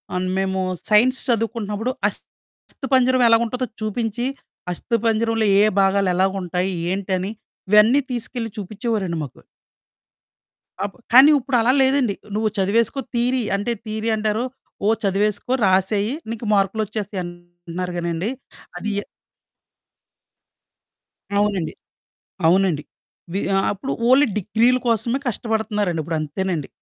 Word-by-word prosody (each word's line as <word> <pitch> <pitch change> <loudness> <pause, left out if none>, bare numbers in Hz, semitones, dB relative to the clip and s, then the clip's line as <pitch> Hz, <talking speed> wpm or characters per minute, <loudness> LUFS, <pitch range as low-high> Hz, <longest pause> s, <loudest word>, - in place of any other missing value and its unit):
అన్ 180 0 -1
మేమూ 190 0 0 0.3
సైన్స్ 245 +5 +5
చదువుకుంటన్నప్పుడు 225 0 -1 0.2
అస్థిపంజరం 260 -2 -1
ఎలాగుంటదో 235 +2 +2
చూపించి, 225 +2 -2 0.5
అస్థిపంజరంలో 225 +2 0
ఏ - - +6
ఏ - - +4
భాగాలెలాగుంటాయి, 190 -1 +1 0.2
ఏంటని 190 0 -2 0.4
ఇవన్నీ 215 +6 +6
తీసుకెళ్ళి 240 -1 -4
చూపిచ్చేవోరండి 205 -3 -2
మాకు. 140 - -10 1.5
అప్ 205 - -7 0.2
కానీ 270 +5 +9
ఉప్పుడలా 250 -2 +2
లేదండి. 265 -6 +2 0.2
నువ్వు 215 0 +1
చదివేసుకో 220 +7 +1 0.2
థీరీ 250 +2 +2
అంటే, 205 +4 -1
థీరీ 220 +1 -2
అంటారు. 215 +1 0 0.4
ఓ - - +4
చదివేసుకో, 205 +4 0
రాసేయి, 195 +4 +2 0.2
నీకు 230 0 -5
మార్కులొచ్చేస్తాయి 205 0 -1
అంటన్నారు 175 0 -7
గానండీ. 170 +3 -2 0.5
అదీ 215 +4 -3
య - - -3 2.4
అవునండి. 200 -6 0 0.7
అవునండి. 175 -3 +3 0.5
వి 195 - -1 0.2
ఆహ్, 195 - +2
అప్పుడు 205 +7 -4 0.2
ఓన్లీ 270 +3 +6
డిగ్రీల 230 +5 +2
కోసమే 235 +2 +1
కష్టపడతన్నారండి, 210 -6 -1
ఇప్పుడంతేనండి. 160 +1 -3
210 Hz, 100 wpm, -21 LUFS, 190-230 Hz, 2.4 s, కానీ